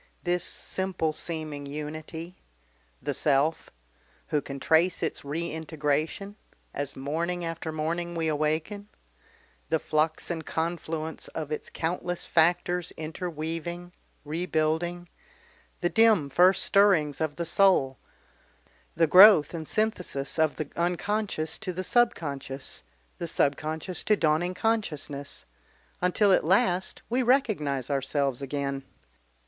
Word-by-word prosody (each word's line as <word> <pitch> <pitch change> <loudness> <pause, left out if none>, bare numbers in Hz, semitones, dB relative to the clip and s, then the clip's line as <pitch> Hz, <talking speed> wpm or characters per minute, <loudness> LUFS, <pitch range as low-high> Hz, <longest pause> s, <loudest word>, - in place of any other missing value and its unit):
this 180 0 +1
simple 185 -4 -1
seeming 155 -3 -3
unity 155 +4 -6 0.7
the - - -1
self! 150 +2 +1 0.6
Who 150 - +1
can 140 0 -7
trace 165 +5 +2
its - - -2
reintegration 160 +4 -2 0.4
as 145 -1 -3
morning 170 +6 -2
after 165 -1 -4
morning 170 +3 -2
we 165 -1 -1
awaken, 155 +7 -1 0.8
the - - +3
flux 155 +2 0
and 165 -2 -3
confluence 160 -1 -3
of 155 -2 -4
its 150 - -4
countless 175 +1 -3
factors 175 +1 +2
interweaving, 165 +1 -5 0.3
rebuilding, 165 +2 -1 0.7
the 175 - +2
dim 215 -11 +4
first 180 +5 +5
stirrings 175 -8 +3
of 155 -2 -1
the 170 - -3
soul, 165 -8 +3 1.0
the 165 - +4
growth 180 -2 +8
and 160 -2 -5
synthesis 180 -10 -2
of 155 -2 +3
the 155 - -4
unconscious 175 -1 -1
to 200 -4 -4
the 185 +1 -4
subconscious, 145 - 0 0.4
the 170 - -3
subconscious 155 +4 -1
to 215 - +4
dawning 165 +3 +1
consciousness, 155 -10 -2 0.6
until 185 +3 +3
at - - +3
last 185 +1 +1
we 250 +3 +1
recognise 205 - +1
ourselves 140 -1 0
again. 140 0 -3
160 Hz, 115 wpm, -27 LUFS, 150-180 Hz, 1.0 s, growth